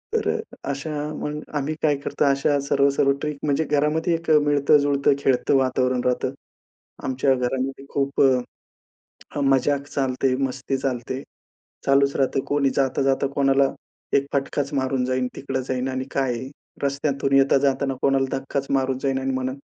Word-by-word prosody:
तर - - 0 0.4
अशा 140 +3 -3 0.2
मग 150 +1 -4
आम्ही 145 +2 -1
काय 150 -2 +4
करतो? 140 - -1
अशा 140 +1 +2
सर्व-सर्व 140 0 +2
ट्रिक 150 -1 -3
म्हणजे 150 +1 +1
घरामध्ये 150 +4 +1
1 165 0 -6
अ, 150 - +7
मिळत-जुळतं, 145 -1 +3
खेळतं 135 0 +2
वातावरण 130 -1 +1
राहतं. 125 +1 0 0.7
आमच्या 130 +1 +1
घरामध्ये 130 +2 -2
खूप 140 0 0
अ, 130 -2 +1 0.8
मजाक 140 +1 +2
चालते, 130 -1 0
मस्ती 130 +1 -2
चालते. 130 +1 -3 0.6
चालूच 140 0 +3
राहतं 135 0 +1
कोणी 145 -2 +1
जाता-जाता 135 0 +1
कोणाला 135 -1 +3 0.4
1 140 0 +1
फटकाच 140 +1 -1
मारून 130 -1 0
जाईन, 130 0 0
तिकडं 135 -1 -3
जाईन 130 0 -1
आणि 130 0 -3
काय 135 -2 0
आहे. 130 +3 -6 0.3
रस्त्यातून 140 0 -1
येता-जाताना 135 0 +3
कोणाला 135 -1 +3
धक्काच 135 +1 -3
मारून 135 -1 +1
जाईन 135 -1 0
आणि 135 0 -2
म्हणलं, 130 0 -2
135 Hz, 145 wpm, -23 LUFS, 130-140 Hz, 0.8 s, अ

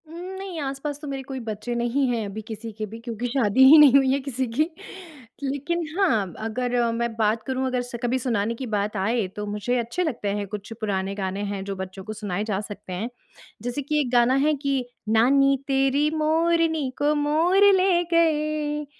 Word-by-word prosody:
उम, 315 - -13 0.2
नहीं 380 -4 -6
आस-पास 275 +1 -4
तो 300 - -7
मेरे 270 -1 -4
कोई 265 0 -6
बच्चे 215 +2 -4
नहीं 240 +3 +1
हैं 230 -3 -1
अभी 205 +2 -6
किसी 225 0 -6
के 215 - -2
भी 225 - -7
क्योंकि 235 0 -4
शादी 245 -1 +3
ही 305 +4 +10
नहीं 295 -4 +8
हुई 270 -1 +5
है 275 - +1
किसी 265 -1 -3
की। 305 - +5 0.8
लेकिन 285 +5 -2 0.2
हाँ, 220 - +2
अगर 240 +1 0
मैं 235 0 -1
बात 220 0 +1
करूँ 260 0 -2
अगर 250 -1 0
स 245 0 -8
कभी 245 +2 +1
सुनाने 230 -3 0
की 260 - -5
बात 210 +1 -1
आए, 215 +2 0
तो 210 +3 -6
मुझे 210 +4 -1
अच्छे 240 +10 -2
लगते 245 - -2
हैं 200 - -4
कुछ 205 +2 -7
पुराने 195 -2 -2
गाने 195 0 -3
हैं, 195 -1 -4
जो 195 0 -4
बच्चों 190 0 -7
को 215 - -6
सुनाए 205 -2 -3
जा 210 -3 -2
सकते 205 -2 -8
हैं। 210 +7 -3 0.5
जैसे 245 +4 -3
कि 300 +2 0
एक 250 -4 -3
गाना 245 +1 +4
है 305 - +3
कि 275 -2 +1 0.3
नानी 275 +5 +4
तेरी 270 +2 +2
मोरनी 320 -1 +1
को 295 +1 +3
मोर 335 +7 +4
ले 370 -2 +3
गए। 305 -2 +1
250 Hz, 200 wpm, -24 LUFS, 215-290 Hz, 0.8 s, ही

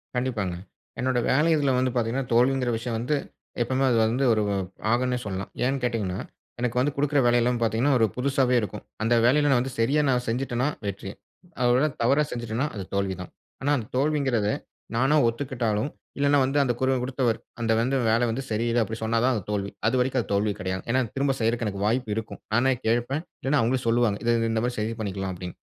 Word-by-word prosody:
கண்டிப்பாங்க. 115 -8 -1 0.4
என்னோட 125 0 +1
வேலை 150 +5 +3
இதில 140 -3 +2
வந்து 130 0 +1
பார்த்தீங்கன்னா 120 +2 -1
தோல்விங்கிற 125 +1 +3
விஷயம் 115 0 -3
வந்து, 125 +6 0 0.5
எப்பவுமே 130 +3 +1
அது 115 - +3
வந்து 120 +5 0
ஒரு 110 - +1 0.5
ஆகுன்னே 125 +1 +1
சொல்லலாம். 95 -1 -4 0.2
ஏன்னு 135 0 0
கேட்டீங்கன்னா, 110 -7 -1 0.4
எனக்கு 125 0 -1
வந்து 140 +3 +1
கொடுக்கிற 145 0 +2
வேலை 120 0 +4
எல்லாம் 120 0 +1
பார்த்தீங்கன்னா 115 +5 +2
ஒரு 115 - +5
புதுசாவே 130 -1 +2
இருக்கும். 105 0 -5 0.2
அந்த 115 - +2
வேலையில 140 +2 +4
வந்து 130 +2 -2
சரியா 140 +7 +3 0.3
செஞ்சுட்டேன்னா 125 +2 0 0.2
வெற்றி. 100 -1 -4 0.5
அ - - +1
ஒருவேள 130 +5 +4
அத 135 - -13
தவறா 140 +5 +4
செஞ்சுட்டேன்னா 120 +3 -2
அது 100 - -4
தோல்வி 100 -1 0
தான். 95 - -9 0.3
ஆனா 140 +2 +1
அந்த 110 -4 -5
தோல்விங்கறதை 130 -7 +1 0.4
நானே 135 +5 +3
ஒத்துக்கிட்டாலும், 120 -1 -1 0.3
இல்லன்னா 145 0 +3
வந்து 135 +2 -1
அந்த 125 -3 +1
குரல் 130 -1 +2
கொடுத்தவர் 125 -3 0 0.2
அந்த 115 -1 +1
வந்து 130 +3 0
'வேலை 115 +2 +3
வந்து 135 +4 -3
சரியில்ல' 115 +2 +1
அப்படின்னு 110 +1 -6
சொன்னா 115 +1 +1
தான் 130 - +3
அது 105 - -3
தோல்வி. 100 -1 -2 0.2
அதுவரைக்கும் 125 +1 +1
அது - - -10
தோல்வி 100 +1 +1
கிடையாது. 95 0 -3
ஏன்னா, 130 +2 +3
திரும்ப 135 0 +1
செய்யறக்கு 115 +1 +1
எனக்கு 100 0 -2
வாய்ப்பு 115 -1 0
இருக்கும். 105 -3 -6
நானே 130 +3 +3
கேட்பேன். 120 +7 0 0.2
இல்லன்னா 140 +1 +2
அவங்களே 125 +2 0
சொல்லுவாங்க. 115 -3 +2
"இத 120 - +4 0.2
இந்த 110 0 0
மாதிரி 125 0 -3
சரி 110 +2 -2
பண்ணிக்கலாம்." 95 -2 -3
அப்படின்னு. 90 0 -7
120 Hz, 190 wpm, -25 LUFS, 110-130 Hz, 0.5 s, ஒரு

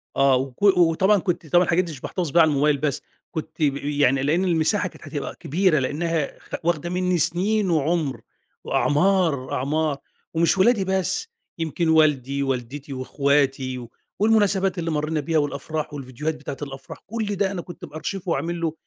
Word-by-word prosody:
آه، 135 -1 +4
وك 130 +5 -3
وطبعًا 190 +1 +4
كُنت 175 -3 -2
طبعًا 175 +4 +4
الحاجات 180 +1 +2
دي 170 - -6
مش 140 -4 -10
باحتفظ 180 -4 -3
بيها 170 - +6
على 160 - +5
الموبايل، 145 0 +2
بس 145 -2 -1 0.3
كنت 160 0 -4
ب 140 -2 +2
يعني 140 -2 +1
لأن 165 +6 +2
المساحة 165 -3 +2
كانت - - -16
هتبقى - - -5
كبيرة، 170 0 +1
لأنها 155 +3 -2
خ - - -21
واخدة 170 0 0
مني 180 0 0
سِنين، 190 +6 +1
وعُمر، 155 -4 0 0.4
وأعمار، 160 -4 +1
أعمار. 150 +2 0 0.4
ومش 165 +3 +2
ولادي 195 0 +4
بس، 190 - -1 0.3
يمكن 165 +1 -1
والدي، 140 -4 +3
والدتي، 135 +2 -4
وأخواتي، 135 -1 0
و 120 -2 -9 0.3
والمناسبات 200 -4 +2
اللي 165 -1 -2
مرينا 150 +1 -1
بيها، 160 +2 0
والأفراح، 150 +1 -2
والفيديوهات 145 +3 -4
بتاعة 145 -2 -7
الأفراح، 135 -1 -8
كلّ 225 +1 -3
ده 195 0 0
أنا 180 -3 -4
كنت 175 - -10
مأرشفه، 170 +4 -5
وعامل 170 +1 -2
له 160 -1 0
155 Hz, 165 wpm, -23 LUFS, 140-180 Hz, 0.4 s, بيها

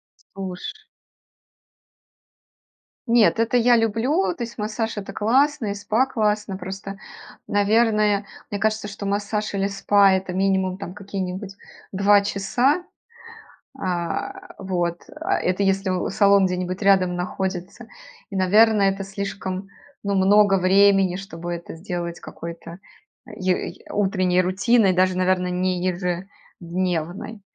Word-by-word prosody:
Слуш 190 -2 -8 2.4
Нет, 230 -1 +4
это 230 +2 +2
я 240 0 +5
люблю. 230 - +1
То 245 - -4
есть, 235 0 -8
массаж- 220 +1 -3
это 195 -1 -6
классно 260 +4 +2
и 200 - -1
спа 215 +5 +1
классно. 210 -5 -1
Просто, 195 +1 -7 0.5
наверное, 210 0 +2 0.3
мне 205 - -2
кажется, 215 0 0
что 200 0 -7
массаж 205 +1 -2
или 195 0 0
спа- 200 0 +4
это, 190 -1 -2
минимум, 190 -1 +1
там, 185 -2 -7
какие-нибудь 195 0 -5 0.4
2 200 +1 +4
часа. 230 - +1 1.0
А, 190 - -4
вот, 175 -3 -2 0.2
а 380 +4 0
это 185 +2 0
если 195 0 +1
у 180 -1 -1
салон 200 0 +4
где-нибудь 185 +1 -3
рядом 190 -3 +3
находится. 180 +1 -4 0.4
И, 200 - -7
наверное, 205 +2 +4
это 195 0 -5
слишком, 195 -1 -5 0.3
ну, 200 -1 -1
много 195 +1 +5
времени, 195 0 +4
чтобы 175 -3 -6
это 170 -1 -7
сделать 175 -1 -5
какой-то 170 +1 -9 0.5
е 185 -5 -1
й - - -15
утренней 185 -3 +2
рутиной, 195 +3 +3
даже 185 0 +2
наверно 185 0 +1
не 180 0 -1
ежедневной. 180 +1 -4
195 Hz, 120 wpm, -23 LUFS, 185-210 Hz, 2.4 s, я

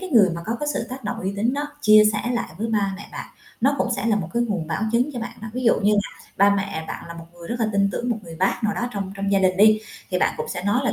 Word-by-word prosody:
cái 375 - -6
người 210 -8 +6
mà 170 - -5
có 230 - -1
cái 295 - -1
sự - - -1
tác 260 -1 -8
động 205 - -3
uy 190 +2 -2
tín 225 +5 +1
đó 285 - -1 0.2
chia 215 -5 +7
sẻ 210 - -1
lại 240 - -2
với 225 - -1
ba 205 -3 +1
mẹ 205 - -10
bạn, - - -6 0.3
nó 275 +4 +3
cũng - - +1
sẽ 225 - -2
là 220 -2 +3
một 180 -6 -3
cái 235 - +2
nguồn 200 -8 -2
bảo 160 +4 -2
chứng 250 +5 +2
cho 250 - -5
bạn 235 - -6
đó. 225 - -6
Ví 255 +2 -3
dụ 230 - +6
như 205 +1 +3
là 205 0 +1 0.3
ba 200 +1 +5
mẹ 195 -5 -3
bạn - - -6
là 170 - -7
một 165 -1 -9
người 170 -1 -11
rất 235 0 -3
là 225 - +2
tin 200 0 +3
tưởng 245 0 -2
một 235 - +1
người 165 -3 -10
bác 190 +6 0
nào 205 -2 +1
đó 245 - -2
trong 195 -2 -4
trong 200 0 -1
gia 195 - +5
đình 185 -1 +2
đi, 215 +2 +6 0.3
thì 180 - +1
bạn - - +2
cũng - - -4
sẽ 180 - -4
nói 205 +5 +2
là - - +1
205 Hz, 330 wpm, -23 LUFS, 195-235 Hz, 0.3 s, chia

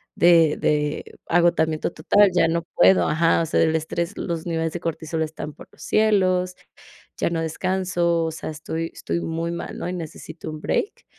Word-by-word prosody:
de 165 -3 +5
de 150 0 0 0.2
agotamiento 165 -2 +2
total, 200 +6 +4
ya 165 - +4
no 170 +1 0
puedo, 90 -1 +5
ajá, 165 +1 +3
o - - 0
sea, - - +1
del 160 0 +3
estrés, 170 +4 -2
los 170 -2 -3
niveles 165 -1 -1
de 175 - -4
cortisol 160 -1 -2
están 155 -1 -6
por - - -14
los - - -19
cielos, 185 -4 +2 0.6
ya - - 0
no 165 -1 -1
descanso, 175 0 0
o 160 - -1
sea, 160 - -6
estoy 160 +2 -4
estoy - - -3
muy 165 0 -3
mal, 170 - -6
¿no?, 180 - -4
y - - -3
necesito 160 -1 -7
un 155 0 -7
break", 405 - -2
165 Hz, 180 wpm, -23 LUFS, 160-175 Hz, 0.6 s, de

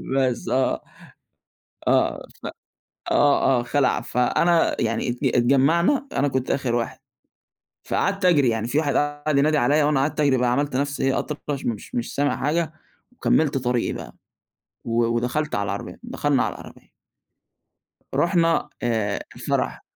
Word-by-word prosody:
بس 130 -3 0
آه، 130 0 +1 1.1
آه، - - +1 0.2
ف - - -6 0.7
آه، 140 -2 +4
آه - - -3
خَلع. 135 +2 +1
فأنا 165 +7 +1
يعني 115 +1 -1
ات 120 - -4
اتجمّعنا، 140 - +3
أنا 145 - +1
كنت 130 -1 -2
آخر 130 -3 0
واحد. 120 -1 -2 0.9
فقعدت 195 -1 -1
أجري 145 -8 +4
يعني 115 0 -1
في 125 - -1
واحد 145 -2 0
قعد 145 0 0
ينادي 150 +2 +3
عليّا 145 +4 +3
وأنا 150 -2 +2
قعدت 150 +3 -1
أجري 140 -3 +3
بقى، 125 -1 +1
عملت 140 +1 0
نَفْسي 140 +2 -1
إيه 135 0 +2
أطرش 145 -2 -5
مش 115 -4 -4
مش 120 0 -3
سامع 145 0 +1
حاجة، 155 +2 -1 0.4
وكملت 155 - +1
طريقي 125 -2 0
بقى. - - -9 0.7
و 115 0 +1
ودخَلت 120 +6 -1
على 100 - 0
العربية، - - -5
دخَلنا - - 0
على - - -3
العربية. - - -13 1.3
رُحنا 170 -1 +2
آآ 110 -4 0 0.2
الفرح، - - -2
140 Hz, 145 wpm, -23 LUFS, 120-150 Hz, 1.3 s, آه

